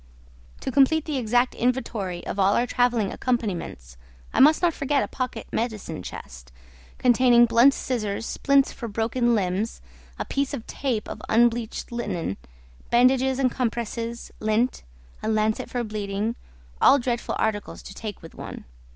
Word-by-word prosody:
To - - -3
complete 285 +4 +4
the 300 -3 -2
exact 245 +2 +2
inventory 230 -8 -2
of 200 - -4
all 195 +1 +4
our 240 - +2
travelling 245 -5 +1
accompaniments, 185 - -3 0.4
I - - +1
must 305 +5 +6
not 345 -2 +4
forget 280 -1 0
a - - -3
pocket 250 -3 -4
medicine 220 - -3
chest, - - -10 0.5
containing 245 -1 +5
blunt 235 +4 +5
scissors, 220 -4 -2
splints 275 +1 +2
for 235 - -6
broken 230 +2 +1
limbs, 195 +2 -1 0.4
a - - -3
piece 280 +1 -1
of 230 - -8
tape 245 -6 -2
of 215 - -7
unbleached 235 0 +1
linen, 190 - -3 0.5
bandages 255 +2 +4
and 260 -2 +2
compresses, 235 -1 -3
lint, 215 +4 +1 0.4
a - - -4
lancet 215 0 0
for 245 -2 -2
bleeding, 210 +1 -3 0.5
all 280 - +7
dreadful 240 -2 -2
articles 215 -2 -2
to - - -9
take 210 -3 -7
with 165 - -11
one. - - -8
235 Hz, 150 wpm, -25 LUFS, 215-255 Hz, 0.5 s, all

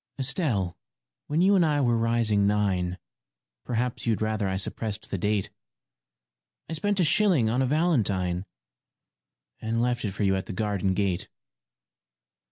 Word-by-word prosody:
] - - -52
ESTELLE, 125 - -1 0.5
when 155 +3 +1
you 200 +2 +5
and 185 - +4
I 150 -2 +2
were 120 -4 +2
rising 115 -3 +2
nine 95 -4 0 0.7
Perhaps 120 0 -2
you'd 110 -2 +1
rather 110 -2 -1
I 95 0 -1
suppressed 105 +2 -2
the 100 - -1
date 105 +1 0 1.2
I - - -5
spent 205 +5 0
a - - +4
shilling 160 - +3
on 125 +3 +1
a 130 - +2
valentine 100 - +1 1.1
And 115 +1 -1
left 120 0 0
it 100 -3 -2
for 100 - -2
you 95 -1 +3
at 95 - -3
the - - -5
garden 100 -2 -1
gate. 95 -3 -1
110 Hz, 155 wpm, -26 LUFS, 100-130 Hz, 1.2 s, you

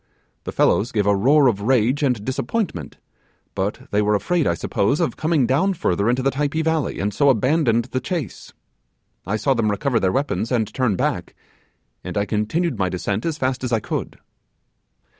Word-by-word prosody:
The - - -4
fellows 115 - +2
gave 105 -2 0
a 100 0 +3
roar 140 +8 +4
of 110 -6 +2
rage 125 +4 +2
and 125 -7 0
disappointment; 165 - -3 0.6
but 95 +2 -2
they 105 - +2
were 105 0 +2
afraid, 165 - 0
I 85 - +1
suppose, 100 - 0
of 170 - 0
coming 155 -4 +1
down 185 +11 +1
further 100 - 0
into 125 +2 +1
the 135 - +2
Typee 145 +3 -1
valley, 160 -2 -1
and 100 +1 -1
so 140 -1 +3
abandoned 125 -1 +2
the 130 - 0
chase. 150 - -5 0.8
I 100 - 0
saw 135 +5 +1
them 115 -3 0
recover 120 +3 0
their 95 - +1
weapons 135 -1 -1
and 110 -4 0
turn 125 -6 +1
back; - - -2 0.7
and - - -5
I 100 - +1
continued 115 +13 -1
my 95 -1 +1
descent 100 - -2
as 160 -2 -2
fast 130 -2 -2
as 125 - -2
I 115 - +2
could. - - -4
125 Hz, 185 wpm, -21 LUFS, 105-145 Hz, 0.8 s, roar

